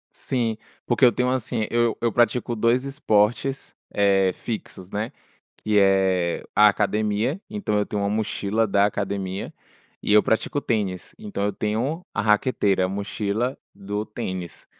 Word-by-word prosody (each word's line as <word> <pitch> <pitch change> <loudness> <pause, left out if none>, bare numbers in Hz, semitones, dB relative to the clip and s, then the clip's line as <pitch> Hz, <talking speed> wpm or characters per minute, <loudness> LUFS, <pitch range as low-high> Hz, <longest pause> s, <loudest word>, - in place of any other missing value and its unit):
Sim, 115 -4 -1 0.3
porque 120 +2 0
eu 125 - +8
tenho, 125 +3 0
assim, 125 -3 -1
eu 120 -1 +2
eu 115 - +1
pratico 120 0 +2
dois 115 +3 +2
esportes, 135 -1 0 0.2
eh, 95 -2 +3
fixos, 95 -3 -7
né, 105 +3 -3 0.5
que 105 -1 0
é 95 -3 +3
a 105 +1 +8
academia, 105 - +1
então 205 - -2
eu 105 - +1
tenho 105 -1 -3
uma 100 - 0
mochila 110 0 0
da 100 0 +3
academia. 100 -2 -3 0.5
E - - -1
eu 105 - +8
pratico 110 +5 0
tênis, 100 -7 -2
então 210 - -4
eu 105 - 0
tenho 125 +11 -2
a 100 - 0
raqueteira, 105 -3 +2
a - - 0
mochila 105 +5 -2 0.2
do 100 +1 -4
tênis. 95 -5 -6
105 Hz, 150 wpm, -24 LUFS, 100-120 Hz, 0.5 s, eu